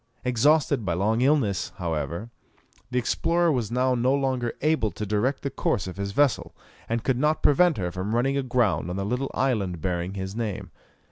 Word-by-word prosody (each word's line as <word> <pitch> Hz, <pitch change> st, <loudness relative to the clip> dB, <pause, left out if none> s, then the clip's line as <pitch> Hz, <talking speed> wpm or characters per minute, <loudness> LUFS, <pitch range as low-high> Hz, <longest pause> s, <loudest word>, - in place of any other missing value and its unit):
Exhausted 140 Hz, +1 st, +3 dB
by 85 Hz, -4 st, -1 dB
long 110 Hz, +6 st, +1 dB
illness, 125 Hz, -, +1 dB
however, 85 Hz, +3 st, -3 dB, 0.6 s
the 125 Hz, -, -2 dB
explorer 170 Hz, +7 st, +1 dB
was 120 Hz, -7 st, -1 dB
now 125 Hz, +2 st, +1 dB
no 125 Hz, +2 st, +2 dB
longer 130 Hz, -4 st, -1 dB
able 155 Hz, -7 st, +2 dB
to 105 Hz, -, -5 dB
direct 110 Hz, +7 st, 0 dB
the 140 Hz, -, -2 dB
course 95 Hz, -, -1 dB
of 95 Hz, 0 st, -7 dB
his 100 Hz, 0 st, -3 dB
vessel, 140 Hz, +4 st, +1 dB, 0.3 s
and 115 Hz, 0 st, -1 dB
could 130 Hz, -2 st, 0 dB
not 150 Hz, +2 st, +1 dB
prevent 165 Hz, +3 st, +4 dB
her 90 Hz, -3 st, -2 dB
from 95 Hz, +5 st, -3 dB
running 135 Hz, +3 st, +1 dB
aground 120 Hz, -, +1 dB
on 90 Hz, -, -3 dB
the 100 Hz, 0 st, -2 dB
little 125 Hz, +5 st, -1 dB
island 105 Hz, -10 st, 0 dB
bearing 90 Hz, +2 st, -2 dB
his 95 Hz, +1 st, -5 dB
name. 110 Hz, -4 st, -4 dB
120 Hz, 185 wpm, -25 LUFS, 100-135 Hz, 0.6 s, prevent